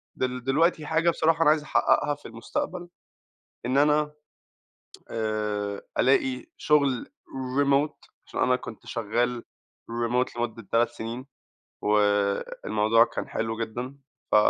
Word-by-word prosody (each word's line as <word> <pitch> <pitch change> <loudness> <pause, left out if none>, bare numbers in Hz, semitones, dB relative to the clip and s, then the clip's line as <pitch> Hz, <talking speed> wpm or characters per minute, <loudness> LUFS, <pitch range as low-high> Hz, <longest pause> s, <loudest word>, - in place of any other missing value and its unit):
دل 125 -1 -2
دلوقتي 155 +4 +2
حاجة 165 +2 +2
بصراحة 165 0 +2
أنا 150 - +6
عايز 155 0 +3
أحققها 145 +2 +2
في 145 - -12
المستقبل 175 +10 -4 0.8
إن 130 +2 +2
أنا 150 +1 +3 1.0
آآ 105 -2 -2 0.2
ألاقي 130 -1 +2
شغل 140 -5 +2 0.6
Remote 140 +2 +1 0.2
عشان - - -5
أنا 125 - +4
كنت 115 -3 -8
شغال 120 +2 -1 0.5
Remote 120 +2 0
لمدة 115 -2 -3
3 115 +1 +3
سنين، 115 +3 -6 0.6
والموضوع 105 +2 +2
كان - - -5
حلو 110 0 -2
جدًا 120 +4 -4 0.4
ف - - +4
120 Hz, 115 wpm, -26 LUFS, 110-145 Hz, 1.0 s, أنا